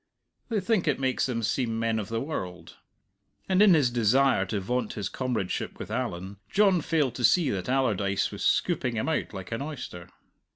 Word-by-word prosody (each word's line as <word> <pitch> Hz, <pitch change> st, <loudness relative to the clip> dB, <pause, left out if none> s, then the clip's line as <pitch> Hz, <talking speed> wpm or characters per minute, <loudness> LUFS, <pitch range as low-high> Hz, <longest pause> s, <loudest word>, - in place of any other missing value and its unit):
They 225 Hz, -3 st, +1 dB
think 205 Hz, -4 st, 0 dB
it 145 Hz, -, +1 dB
makes 130 Hz, -1 st, 0 dB
them 115 Hz, -3 st, -2 dB
seem 115 Hz, 0 st, 0 dB
men 115 Hz, -1 st, 0 dB
of 105 Hz, -, -4 dB
the 115 Hz, 0 st, -1 dB
world. 90 Hz, -, -6 dB, 0.7 s
And 190 Hz, +1 st, +3 dB
in 200 Hz, -4 st, +7 dB
his 135 Hz, -6 st, +3 dB
desire 120 Hz, -2 st, +3 dB
to 100 Hz, +2 st, -2 dB
vaunt 120 Hz, +3 st, -2 dB
his 105 Hz, -3 st, -3 dB
comradeship 120 Hz, -8 st, -3 dB
with -, -, -7 dB
Allan, 95 Hz, +3 st, -3 dB
John 195 Hz, -4 st, +3 dB
failed 150 Hz, -6 st, +1 dB
to -, -, -5 dB
see 170 Hz, -6 st, +4 dB
that 95 Hz, +2 st, -3 dB
Allardyce 105 Hz, -7 st, +1 dB
was -, -, -6 dB
scooping 130 Hz, -8 st, +1 dB
him 110 Hz, -, -1 dB
out 160 Hz, -, -1 dB
like 95 Hz, 0 st, -8 dB
an 115 Hz, -, -2 dB
oyster. 125 Hz, -, -7 dB
125 Hz, 190 wpm, -27 LUFS, 100-145 Hz, 0.7 s, in